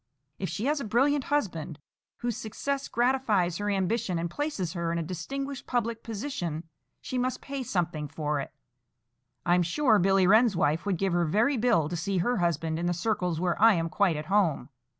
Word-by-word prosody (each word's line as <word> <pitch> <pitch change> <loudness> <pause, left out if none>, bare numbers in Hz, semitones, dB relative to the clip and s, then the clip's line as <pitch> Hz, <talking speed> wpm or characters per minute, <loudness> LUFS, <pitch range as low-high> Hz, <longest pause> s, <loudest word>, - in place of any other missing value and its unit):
If 190 - -2
she 220 - -3
has 295 +1 +1
a - - -4
brilliant 265 +5 +2
husband, 175 - -2 0.4
whose 240 -2 -1
success 275 +6 -3
gratifies 235 -9 +1
her 205 0 -1
ambition 200 0 0
and 170 0 -3
places 210 - -2
her 170 -1 -2
in 170 - -1
a 165 - -1
distinguished 270 - -5
public 235 -2 -1
position, 190 - -4 0.3
she 255 - -3
must 255 +1 -1
pay 275 -1 -5
something 170 -9 -2
for 150 0 -2
it. - - -5 0.9
I'm 175 +1 +4
sure 215 - +3
Billy 195 0 +4
Wren's 215 +2 +5
wife 160 +4 +1
would 190 -3 +1
give 195 0 0
her 175 0 +2
very 220 - +2
bill 225 - +2
to 175 - -4
see 185 +4 -1
her 240 +8 +1
husband 165 -2 0
in 175 - -1
the 175 - 0
circles 180 -3 -1
where 180 +1 -1
I 225 -1 +7
am 165 -1 -1
quite 185 -1 +2
at 150 +1 -4
home. 180 -9 +1
195 Hz, 190 wpm, -28 LUFS, 170-240 Hz, 0.9 s, I